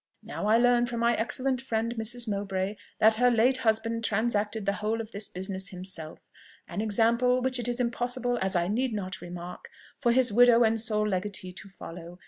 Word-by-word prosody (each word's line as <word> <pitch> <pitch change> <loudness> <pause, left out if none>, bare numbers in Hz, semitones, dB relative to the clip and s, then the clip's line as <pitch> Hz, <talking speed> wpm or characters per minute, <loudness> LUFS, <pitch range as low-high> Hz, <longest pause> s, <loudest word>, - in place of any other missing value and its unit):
Now 205 - -4
I 220 +2 +5
learn 240 0 +3
from 240 -1 -4
my 235 0 +3
excellent 255 +3 -1
friend 230 -2 -2
Mrs. 235 +1 -1
Mowbray, 200 -1 -2 0.2
that 220 +1 +6
her 250 - +6
late 245 +2 +3
husband 230 -1 0
transacted 215 -1 0
the 200 - +1
whole 220 +2 -1
of 225 -1 -6
this 200 0 -4
business 190 +1 -4
himself; 180 -4 -6 0.4
an 205 - -4
example 235 +4 +2
which 255 0 0
it 240 - -1
is 240 0 -2
impossible, 245 0 -1
as 190 0 0
I 175 0 +1
need 240 +4 -1
not 185 -2 -5
remark, 175 0 -8 0.3
for 240 -3 +2
his 245 -2 +2
widow 240 +1 +6
and 225 0 +2
sole 215 -2 +1
legatee 185 -1 -2
to 195 - -9
follow. 175 -2 -10
220 Hz, 190 wpm, -28 LUFS, 200-240 Hz, 0.4 s, that